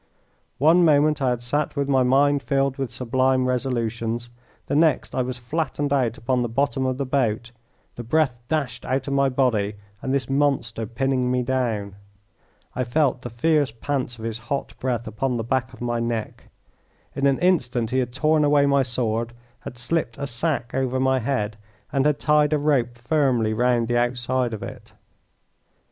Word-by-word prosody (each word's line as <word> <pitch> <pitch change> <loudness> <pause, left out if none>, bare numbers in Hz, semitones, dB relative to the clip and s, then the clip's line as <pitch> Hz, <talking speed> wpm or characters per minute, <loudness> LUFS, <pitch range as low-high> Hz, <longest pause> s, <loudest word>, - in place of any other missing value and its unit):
One 165 +6 +5
moment 150 -1 +4
I 130 - +2
had 120 -1 -2
sat 145 +6 -1
with 140 -1 -1
my 135 -2 +3
mind 140 +3 +3
filled 135 -1 0
with 135 -3 -2
sublime 130 +1 +1
resolutions, 120 -2 -2 0.3
the - - -2
next 155 -1 +2
I 130 - 0
was 125 0 -3
flattened 145 +2 -2
out 125 -5 +1
upon 125 +2 0
the 120 - -1
bottom 135 +2 0
of 130 -1 -1
the 140 - -2
boat, 120 -3 0 0.5
the 120 - -5
breath 125 -1 +1
dashed 150 -2 -2
out 135 +2 -1
of 140 - -1
my 140 0 +3
body, 115 -6 +1 0.3
and 130 - -3
this 135 -3 0
monster 135 -6 0
pinning 130 +2 0
me 125 0 +1
down. 115 -6 -2 0.8
I 125 - 0
felt 130 0 +1
the 120 - -6
fierce 145 +4 +2
pants 125 +1 -3
of 110 - -7
his 115 -1 -3
hot 140 -1 -2
breath 120 -3 -2
upon 120 +4 -2
the 115 - -2
back 130 +1 -1
of 125 - -15
my 120 -1 -1
neck. 115 -2 -3 0.7
In 140 0 +2
an 135 -1 +2
instant 125 -11 +1
he 130 - +2
had 125 -2 -1
torn 155 +4 +2
away 145 -1 +4
my 140 -1 +3
sword, 120 -2 -1 0.3
had 125 - -9
slipped 125 -1 -2
a 140 - -3
sack 130 -1 -2
over 130 -1 0
my 130 0 +2
head, 110 -4 -2 0.4
and 135 +1 +3
had 150 -1 +2
tied 150 0 +3
a - - +3
rope 135 -5 +1
firmly 120 -4 +1
round 120 0 +2
the 120 0 +2
outside 125 0 0
of 105 - -8
it. - - -9
130 Hz, 185 wpm, -23 LUFS, 120-140 Hz, 0.8 s, One